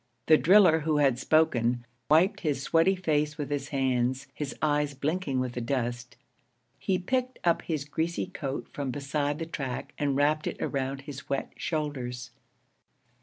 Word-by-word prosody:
The 155 - +7
driller 180 0 +6
who 155 -1 0
had 135 -4 +3
spoken 125 -6 +2 0.2
wiped 165 +6 +4
his 145 -4 -1
sweaty 165 +6 +3
face 150 -4 0
with 145 -2 -4
his 145 -1 -2
hands, 130 -1 0
his 145 -2 -5
eyes 150 -1 +1
blinking 145 0 -1
with 130 -1 -1
the 125 - -3
dust. 120 -1 -3 0.6
He 190 -2 +1
picked 255 +7 -1
up 170 -1 +3
his 155 -4 -3
greasy 160 +4 -2
coat 135 -2 -5
from 140 -2 -3
beside 145 +2 -1
the 165 - -4
track 135 -6 -5
and 140 -2 +1
wrapped 150 +2 +2
it - - -3
around 135 0 -2
his 140 -1 -9
wet 140 -1 -2
shoulders. 130 -6 -3
145 Hz, 160 wpm, -28 LUFS, 135-160 Hz, 0.6 s, The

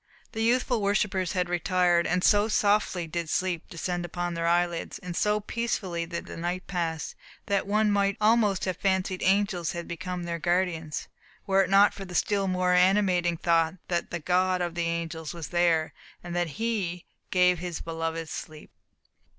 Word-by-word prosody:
The 220 - -4
youthful 240 0 +2
worshippers 200 -2 0
had 180 -2 0
retired. 175 0 +2
And 180 +1 0
so 205 0 +4
softly 205 -4 +1
did 165 0 -4
sleep 180 -2 -1
descend 175 +1 -3
upon 175 0 -3
their 170 0 -1
eyelids, 175 0 0
and 180 -1 -7
so 210 +2 +2
peacefully 200 -6 -3
did 170 0 -5
the - - -8
night 175 +2 -3
pass, 165 -4 -3 0.3
that 200 -1 0
one 210 +1 +2
might 200 +1 +1
almost 215 -3 +3
have 185 -2 -2
fancied 190 -1 0
angels 190 -3 +1
had 170 -1 -5
become 180 +1 -5
their 170 -1 -3
guardians, 175 -3 -1 0.4
were 195 -1 +3
it 185 - 0
not 200 +1 +6
for 195 - -8
the 180 -2 -8
still 200 +2 +1
more 180 -1 +1
animating 180 -2 +3
thought 165 0 +2
that 175 -1 -1
the 175 - -3
God 185 +2 +1
of 175 -1 -2
the 170 0 -1
angels 165 -1 -3
was 165 -2 -6
there, 170 -2 +2 0.3
and 175 0 -6
that 175 -4 -1
He 200 -7 -2 0.2
"gave 180 -1 +3
his 175 -1 -4
beloved 165 0 -4
sleep." 155 -1 -8
180 Hz, 175 wpm, -27 LUFS, 170-195 Hz, 0.4 s, not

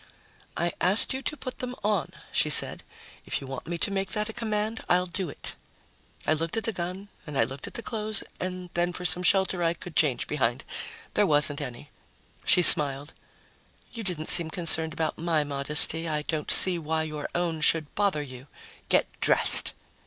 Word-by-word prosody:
"I 170 0 -1
asked 195 +8 +4
you 265 - -5
to 300 - -5
put 255 - -8
them 250 0 -6
on," 205 -6 -1 0.2
she - - +1
said. - - +6 0.5
"If - - -1
you - - -10
want 135 -1 -8
me 170 0 -4
to 185 - -2
make 195 -1 -4
that 210 +1 -2
a - - -7
command, 215 -1 -3
I'll 180 +1 +2
do 185 -1 -6
it." - - -4 0.7
I - - +2
looked 165 +5 -4
at 225 - -2
the 225 - -3
gun 185 +3 -7 0.2
and 150 -2 -6
I 115 - +3
looked 135 +4 -7
at - - -12
the 230 - -5
clothes 215 -2 0 0.2
and 180 -1 -6
then 175 +1 -1
for 180 - -7
some 175 +1 +1
shelter 190 -1 +1
I 170 0 0
could 170 -1 -10
change 140 -6 +1
behind. 120 -5 -2 0.5
There - - +1
wasn't 145 -1 0
any. 120 -1 -9 0.6
She 180 - +5
smiled. 145 -2 +8 0.8
"You 230 - -6
didn't 175 -5 -3
seem 170 -1 +1
concerned 160 -2 -1
about 160 0 -4
my 165 -2 0
modesty. 150 +3 +3
I 150 -1 -3
don't 155 -1 -5
see 180 -2 +4
why 160 0 -2
your 155 -2 -6
own 170 -2 -2
should 155 -1 +1
bother 200 -7 -1
you. 130 -1 -12 0.4
Get - - +2 0.2
dressed!" - - +5
170 Hz, 190 wpm, -25 LUFS, 150-190 Hz, 0.8 s, smiled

